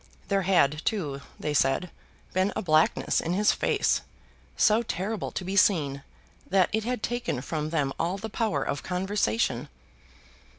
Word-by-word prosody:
There 195 -1 +2
had, 160 -5 +2
too, 150 -11 -2 0.2
they 150 - -2
said, 140 +5 +1 0.4
been 185 +2 +2
a - - -2
blackness 155 -2 +2
in 165 - -2
his 205 +3 +4
face, - - +1 0.6
so 215 +2 +4
terrible 215 -1 -3
to 185 - -5
be 190 +2 -3
seen, 145 -9 +3 0.5
that 185 -1 +3
it 220 0 +1
had 245 -2 -2
taken 240 - -2
from 155 +2 -3
them 145 -4 0
all 175 +4 0
the 220 - -5
power 215 - -1
of 140 - -3
conversation. 180 - -1
180 Hz, 155 wpm, -27 LUFS, 150-205 Hz, 0.6 s, his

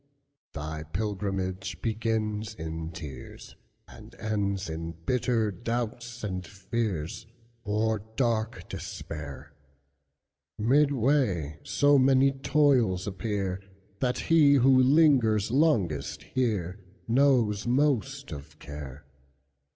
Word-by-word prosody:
Thy 80 +1 -5
pilgrimage 95 +1 -3
begins 110 -1 -2
in 80 -1 -5
tears, 75 -6 -9 0.3
And - - -14
ends 100 -3 -2
in 80 +1 -5
bitter 115 -2 +1
doubts 120 +3 -4
and 95 -3 -3
fears, 95 0 -4 0.4
Or 110 0 0 0.2
dark 110 -6 -1
despair; 70 -1 -7 1.0
Midway 125 - +2
so 145 -1 +3
many 135 +1 +5
toils 135 -9 +2
appear, 100 -2 -3 0.4
That 125 -1 0
he 150 -4 +5
who 135 0 +5
lingers 130 -7 +4
longest 100 - +1
hereKnows 110 +2 +1
most 135 0 +1
of 75 +1 -9
care. 70 -1 -9
110 Hz, 90 wpm, -28 LUFS, 90-125 Hz, 1.0 s, many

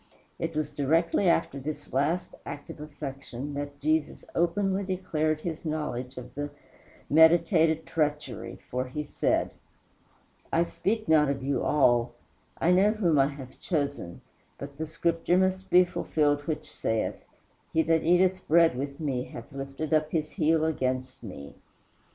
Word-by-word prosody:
It 165 -1 -3
was 155 0 -1
directly 165 +6 +2
after 165 -4 +1
this 150 +3 -6
last 150 +7 0
act 145 - -7
of - - -12
affection 140 -2 -7
that 145 0 -5
Jesus 155 +1 0
openly 190 +3 +1
declared 160 -5 -1
his 165 -2 -5
knowledge 145 -5 -3
of 125 0 -9
the 145 +1 -4 0.6
meditated 160 0 +5
treachery, 150 -7 -2
for 125 +1 -1
he 150 +4 -4
said: 145 - 0 1.0
"I 170 - +3
speak 215 +5 -2
not 150 -2 +5
of 135 -1 -2
you 135 -2 0
all, 120 -5 +3 0.5
I 170 - +3
know 195 +4 +5
whom 175 -9 +2
I 135 - +5
have 140 -3 -9
chosen; 140 - -3 0.4
but 140 0 -8
the 160 - -2
Scripture 165 +2 +1
must 190 0 +1
be 180 0 +6
fulfilled 145 -4 0
which 155 -1 -2
saith, 110 -6 -2 0.5
He 160 - +3
that 165 0 +2
eateth 180 +2 +2
bread 165 -3 +5
with 140 +2 -4
me 135 -5 -2
hath 115 - -10
lifted 140 +3 -4
up 155 0 +3
his 155 -2 -1
heel 160 0 +2
against 130 -4 -2
me." 90 -11 -9
155 Hz, 150 wpm, -28 LUFS, 140-165 Hz, 1.0 s, be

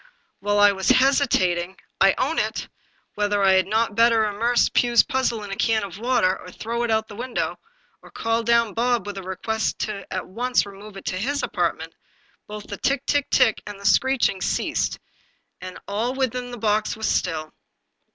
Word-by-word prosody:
While 205 +1 0
I 205 0 +7
was 190 -1 -2
hesitating 190 -10 +2
— - - -40
I 195 0 +5
own 310 +5 0
it! - - -2 0.3
— - - -41
^whether 205 -1 +1
I 190 - +6
had 190 -1 +3
not 220 +1 +1
better 230 0 +4
immerse 230 +4 +2
Pugh's 240 -1 +3
puzzle 240 -4 -1
in 205 - -7
a - - -3
can 220 +1 +1
of 195 -1 -7
water, 230 -6 +1
or 180 - -11
throw 230 +6 -4
it 240 - -1
out 220 0 +2
of - - -38
the 205 - -11
window, 255 -1 -3 0.4
or - - -15
call 225 +1 -1
down 235 -2 +2
Bob 240 0 0
with 205 -1 -5
a - - -7
request 220 +4 -2
to 205 -3 -5
at 185 - -3
once 245 +6 0
remove 200 0 -11
it - - -11
to 185 - -2
his 285 +7 -2
apartment, - - -2 0.5
both 210 0 -7
the 200 - -7
tick, 275 +4 -1
tick, 290 -1 0
tick, 250 -5 +3
and 205 -1 -8
the 200 - -12
screeching 250 -4 +2
ceased, - - -1 0.6
and 185 0 -8
all 225 +6 -2
within 250 -2 -2
the 245 - -7
box 215 0 0
was 220 - -2
still. 155 -3 -1
220 Hz, 200 wpm, -23 LUFS, 195-240 Hz, 0.6 s, I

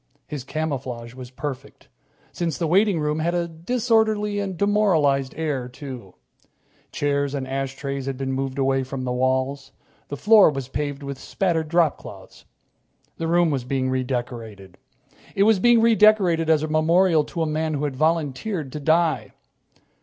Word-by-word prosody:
His 145 -4 -6
camouflage 130 -6 -4
was 130 -1 -9
perfect, 135 +1 -7 0.4
since 170 -3 -3
the 170 - -1
waiting 190 +2 +3
room 150 +1 -1
had 170 +2 0
a 170 -1 0
disorderly 215 +3 0
and 195 -3 -4
demoralized 165 -10 +2
air, 145 -6 -2
too. 125 - -9 0.8
Chairs 140 -1 -1
and 135 -2 -4
ashtrays 135 0 -4
had 135 -1 -3
been 135 0 -3
moved 135 0 -3
away 135 0 +1
from 130 0 -5
the 125 - -2
walls. 130 +2 -1 0.3
The 145 - -6
floor 210 0 +6
was 135 -3 -5
paved 145 0 -4
with 140 -1 -6
spattered 165 -5 -1
dropcloths. 170 -2 -2 0.7
The 165 - -3
room 170 -1 +3
was 135 -3 -1
being 130 0 -1
redecorated. 120 -7 -4 0.6
It 195 - +3
was 215 -1 +4
being 240 +2 +5
redecorated 210 -7 +4
as 155 -1 +3
a - - -1
memorial 160 +1 +3
to 165 - -3
a - - 0
man 155 0 -1
who 145 - -3
had 145 -3 -2
volunteered 155 +1 -1
to 150 - -5
die. 160 -1 +1
150 Hz, 155 wpm, -23 LUFS, 135-170 Hz, 0.8 s, floor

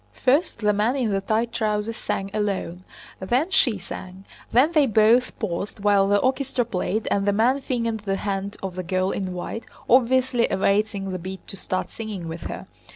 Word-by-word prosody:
First 280 +7 +2
the 210 0 +3
man 215 +5 +1
in 245 -6 0
the 195 0 0
tight 225 +4 0
trousers 215 -1 -1
sang 195 -3 -3
alone, 195 -4 -2 0.4
then 250 - 0
she 240 - +3
sang, 185 +1 -9 0.3
then 270 +7 +4
they 305 -4 +4
both 225 +3 +4
paused 200 -1 -4
while 200 -1 +4
the 205 0 +4
orchestra 260 +1 0
played 215 0 -2
and 200 0 +1
the - - +5
man 240 +7 +2
fingered 230 -4 -1
the 200 -2 -2
hand 200 0 -3
of 190 -2 -3
the 185 - -4
girl 185 +1 0
in 185 -2 -3
white, 205 +5 -5 0.2
obviously 255 0 +3
awaiting 200 0 +1
the 185 - -3
beat 190 +2 -7
to - - -4
start 185 -1 -3
singing 210 -6 -6
with 165 0 -6
her. - - -6
210 Hz, 185 wpm, -24 LUFS, 195-240 Hz, 0.4 s, the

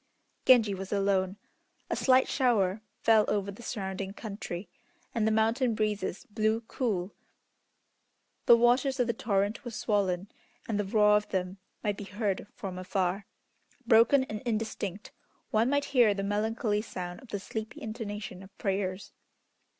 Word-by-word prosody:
Genji 230 -6 +6
was 190 0 -6
alone. 195 -1 +1 0.5
A - - +2
slight 260 0 +4
shower 215 -7 +2 0.2
fell 220 -1 +6
over 200 -1 0
the 200 - -12
surrounding 195 -3 -4
country, 200 -4 -6 0.5
and 225 -2 +1
the - - +3
mountain 225 +2 +2
breezes 210 -3 -2
blew 220 +1 0
cool. 210 -6 -2 1.3
The 235 - +9
waters 255 +3 +3
of 245 - +4
the 235 - 0
torrent 205 -1 0
were 240 - -5
swollen, 200 -4 -1 0.4
and 215 -2 -1
the 205 - 0
roar 210 +1 +5
of 210 - -4
them 185 0 -2 0.2
might 205 -2 0
be 205 - -6
heard 200 0 -2
from 185 -2 -6
afar. 185 +2 -1 0.6
Broken 235 +4 +6
and 215 -5 -6
indistinct, 215 -4 -3 0.4
one 225 +3 +3
might 285 0 +1
hear 235 -6 +5
the 195 - -3
melancholy 210 +1 0
sound 180 -4 -6
of 260 - -15
the 205 - -4
sleepy 220 +3 -6
intonation 210 -4 -6
of 195 +1 -15
prayers. 190 -1 -2
210 Hz, 150 wpm, -29 LUFS, 195-225 Hz, 1.3 s, The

